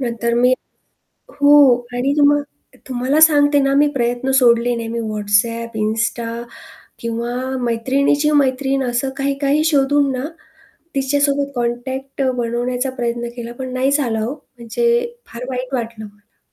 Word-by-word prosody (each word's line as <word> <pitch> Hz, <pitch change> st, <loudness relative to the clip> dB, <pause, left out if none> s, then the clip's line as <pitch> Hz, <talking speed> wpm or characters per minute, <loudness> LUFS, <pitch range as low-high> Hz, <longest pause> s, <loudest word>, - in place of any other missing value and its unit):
नंतर 235 Hz, -2 st, -1 dB
मी 250 Hz, +2 st, +4 dB, 0.9 s
हो 290 Hz, +1 st, +7 dB, 0.4 s
आणि 265 Hz, +3 st, 0 dB
तुम्हा 290 Hz, 0 st, +5 dB, 0.5 s
तुम्हाला 260 Hz, +4 st, 0 dB
सांगते 290 Hz, -2 st, +5 dB
ना 275 Hz, 0 st, +1 dB
मी 290 Hz, +1 st, +4 dB
प्रयत्न 245 Hz, +1 st, -1 dB
सोडले 240 Hz, -1 st, +3 dB
नाही 230 Hz, -1 st, -4 dB
मी 235 Hz, +1 st, -3 dB
WhatsApp, 220 Hz, +2 st, 0 dB
Insta 230 Hz, +1 st, -2 dB, 0.6 s
किंवा 235 Hz, +1 st, -3 dB, 0.3 s
मैत्रिणीची 275 Hz, +5 st, +1 dB
मैत्रीण 270 Hz, 0 st, 0 dB
असं 245 Hz, +2 st, -1 dB
काही-काही 280 Hz, +2 st, 0 dB
शोधून 285 Hz, -2 st, +2 dB
ना 255 Hz, +2 st, -3 dB, 0.7 s
तिच्यासोबत 280 Hz, +1 st, +1 dB
कॉन्टॅक्ट 260 Hz, +3 st, -3 dB
अ, 260 Hz, -, +2 dB
बनवण्याचा 245 Hz, +2 st, -2 dB
प्रयत्न 240 Hz, 0 st, -2 dB
केला, 235 Hz, -1 st, -7 dB
पण 255 Hz, -1 st, -5 dB
नाही 260 Hz, +2 st, +1 dB
झाला 250 Hz, -6 st, 0 dB
हो. 225 Hz, +4 st, -2 dB
म्हणजे 470 Hz, -, -2 dB
फार 235 Hz, +2 st, -8 dB
वाईट 255 Hz, +1 st, -5 dB
वाटलं 230 Hz, -3 st, -5 dB
मला. 205 Hz, 0 st, -19 dB
255 Hz, 135 wpm, -19 LUFS, 235-280 Hz, 0.9 s, हो